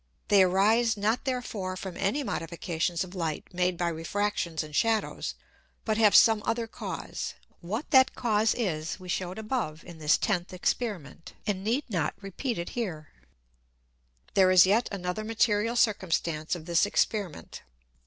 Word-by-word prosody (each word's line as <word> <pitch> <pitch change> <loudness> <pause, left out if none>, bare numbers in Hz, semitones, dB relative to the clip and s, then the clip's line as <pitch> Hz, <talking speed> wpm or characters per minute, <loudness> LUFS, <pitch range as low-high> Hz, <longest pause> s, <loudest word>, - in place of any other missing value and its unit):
They 200 -2 +6
arise 210 +5 +3
not 220 +7 0
therefore 220 -8 -3
from 190 -1 -6
any 240 +9 0
Modifications 170 -2 -2
of 185 0 -10
Light 165 -2 -4
made 180 0 0
by 175 0 0
Refractions 170 0 -2
and 150 -1 -9
Shadows, 225 +2 0 0.5
but 220 0 0
have 210 -2 +5
some 220 -2 +7
other 230 +1 -1
Cause. 225 - -6 0.2
What 210 - -5
that 260 -2 +5
Cause 220 -3 +2
is 165 -8 -2
we 185 - -11
shewed 180 +1 -2
above 215 -8 -3
in 175 -2 -12
this 150 0 +3
tenth 180 -4 -1
Experiment, 185 - -3
and 195 -2 -2
need 240 +7 0
not 180 -9 -1
here - - -27
repeat 220 +5 -3
it. 170 - -4 1.6
There 190 -2 +5
is 185 -1 +8
yet 215 +6 +2
another 185 +1 -3
material 225 0 +1
Circumstance 170 -8 0
of 165 -3 -9
this 170 +3 +3
Experiment. 205 -4 -2
195 Hz, 150 wpm, -28 LUFS, 175-220 Hz, 1.6 s, is